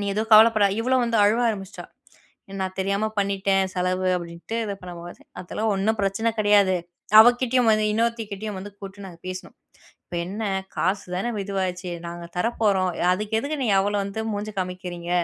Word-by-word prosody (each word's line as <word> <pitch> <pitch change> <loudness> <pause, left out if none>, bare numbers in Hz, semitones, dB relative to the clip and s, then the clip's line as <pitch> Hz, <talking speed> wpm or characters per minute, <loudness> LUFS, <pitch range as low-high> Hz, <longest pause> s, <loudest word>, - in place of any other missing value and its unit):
"நீ - - -2
எதுவும் 220 +2 -2
கவலைப்படா". 215 -2 +7
இவளும் 255 +1 +2
வந்து 230 -1 0
அழுவ 220 +4 +3
ஆரம்பிச்சுட்டா. 195 -3 -7 0.8
"நான் 190 0 -4
தெரியாம 200 +3 0
பண்ணிட்டேன் 195 -1 0
செலவு." 185 +1 0
அப்படின்ட்டு 170 +6 -6
இது 200 -1 -4
பண்ணும்போது, 175 -1 -9 0.2
"அதெல்லாம் 215 +4 -2
ஒண்ணும் 215 +3 0
பிரச்சனை 200 +4 0
கெடையாது." 205 -3 +4 0.4
அவ 220 - +8 0.2
கிட்டேயும் 250 -2 +3
வந்து, 215 0 +2
இன்னொருத்தி 230 0 0
கிட்டேயும் 210 -1 -5
வந்து 205 +1 -9
கூப்புட்டு 195 0 -9
நாங்க 175 -3 -12
பேசினோம். 185 0 -7 0.5
"இப்ப 175 - -6
என்ன 205 +4 -4 0.3
காசு 195 +2 0
தான 195 +7 -1
வ - - -3
இதுவாயிச்சு? 185 -2 -3 0.2
நாங்க 170 0 -7
தர 180 - +1
போறோம். 190 -4 +2 0.2
அதுக்கு 210 +3 -3
எதுக்கு 285 +6 -3
நீ 240 - 0
அவ்வளோ 205 +1 +1
வந்து 200 +2 -4
மூஞ்சி 210 +1 -4
காமிக்கிறீங்க?" 180 -1 -5
200 Hz, 170 wpm, -24 LUFS, 185-220 Hz, 0.8 s, அவ